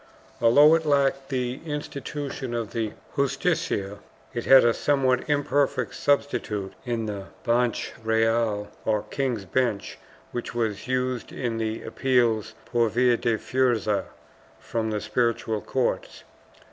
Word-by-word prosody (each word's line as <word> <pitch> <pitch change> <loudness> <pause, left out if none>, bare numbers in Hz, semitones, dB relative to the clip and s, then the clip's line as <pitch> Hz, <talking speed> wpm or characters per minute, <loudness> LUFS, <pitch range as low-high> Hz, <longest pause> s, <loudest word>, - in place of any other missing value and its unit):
Although 145 +7 +7
it 165 0 +3
lacked 140 -2 +1
the 125 0 -2
institution 145 -4 -5
of 115 -3 -3
the 110 -3 -2 0.2
Justicia, 135 - 0 0.3
it 120 - -3
had 135 -2 +8
a 120 - +4
somewhat 130 0 +1
imperfect 140 -4 +1
substitute 115 -8 0
in 115 -2 -1
the 100 -2 -5 0.2
Banch 120 0 +1
Reyal, 110 -2 +1
or 105 -1 +1
King's 125 -8 -1
Bench, 110 0 -1 0.3
which 120 0 -5
was 110 -2 -2
used 130 -1 -1
in 115 -3 -3
the 110 0 -2
appeals 115 -4 +1
por 120 -2 +1
via 125 +2 +3
de 115 -1 0
fuerza 120 -5 +1 0.5
from 115 -1 -2
the 105 -1 -2
spiritual 115 -3 0
courts. 130 -2 -2
120 Hz, 125 wpm, -25 LUFS, 110-135 Hz, 0.5 s, had